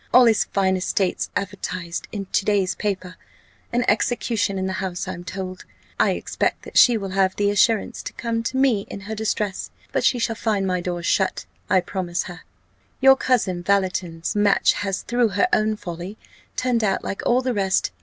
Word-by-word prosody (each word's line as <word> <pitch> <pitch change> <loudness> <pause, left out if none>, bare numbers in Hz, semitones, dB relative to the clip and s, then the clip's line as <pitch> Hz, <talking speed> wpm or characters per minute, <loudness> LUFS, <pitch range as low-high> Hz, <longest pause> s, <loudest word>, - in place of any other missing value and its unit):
All 250 0 +7
his 225 -2 +4
fine 190 -1 +1
estates 185 0 -1
advertised 185 -3 -4
in 200 -2 -4
to 195 - 0
day's 195 -2 +1
paper 190 -3 -3 0.5
an 240 0 +1
execution 215 -2 +1
in 190 - -1
the 190 - -2
House, 185 -1 -3
I'm 180 -2 -5
told. 185 0 -6 0.4
I - - +4
expect - - -2
that - - -11
she 240 -2 +7
will 195 -3 -5
have 190 0 +2
the 205 0 +2
assurance 225 +3 +2
to - - -7
come 230 -1 -2
to 245 +3 -3
me 255 -7 +2
in 200 - -7
her 210 +3 -6
distress: 210 -2 -2 0.2
but - - 0
she 250 - +3
shall 230 -1 -1
find 210 -3 0
my 180 -1 0
doors 175 -1 -3
shut, 190 +1 +1 0.2
I 185 -1 +4
promise 175 -1 -3
her. 175 -1 -9 0.6
Your 270 0 +7
cousin 215 -10 +1
Valleton's 180 -3 0
match 205 -1 +4
has, 195 -1 -3
through 240 -1 +2
her 360 - +4
own 215 0 +3
folly, 180 +1 -7 0.4
turned 245 -3 +1
out 195 -2 +1
like 195 - -4
all 250 +1 +3
the 255 -1 0
rest. 190 - +1
200 Hz, 185 wpm, -23 LUFS, 185-225 Hz, 0.6 s, All